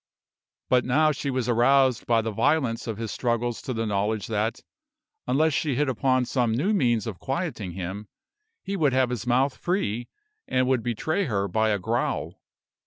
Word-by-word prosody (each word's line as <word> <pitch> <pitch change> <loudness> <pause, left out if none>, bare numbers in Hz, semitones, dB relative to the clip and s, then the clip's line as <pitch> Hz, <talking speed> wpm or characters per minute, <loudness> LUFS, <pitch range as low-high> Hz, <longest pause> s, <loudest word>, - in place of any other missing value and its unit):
But 125 -1 +3
now 155 +5 +3
she 140 0 -3
was 130 -3 -1
aroused 125 +1 +3
by 115 -1 +3
the 110 - -2
violence 125 -1 +1
of 110 -3 -3
his 115 -2 -4
struggles 120 -1 -1
to - - -5
the 115 -2 -2
knowledge 105 0 -1
that, 110 +1 -1 0.7
unless 155 +4 +2
she 140 0 0
hit 145 +3 +1
upon 130 0 +1
some 120 -3 0
new 185 - +1
means 120 - +2
of 105 -6 -6
quieting 130 - -3
him, 95 +3 -5 0.6
he 200 - -3
would 150 -8 +2
have 130 -1 +2
his 125 -1 -4
mouth 130 +2 +2
free, 120 - -2 0.4
and 130 0 +1
would 130 -2 +1
betray 155 - -1
her 100 -7 -1
by 110 +4 +1
a 105 - +2
growl. 90 - -2
120 Hz, 175 wpm, -25 LUFS, 110-135 Hz, 0.7 s, But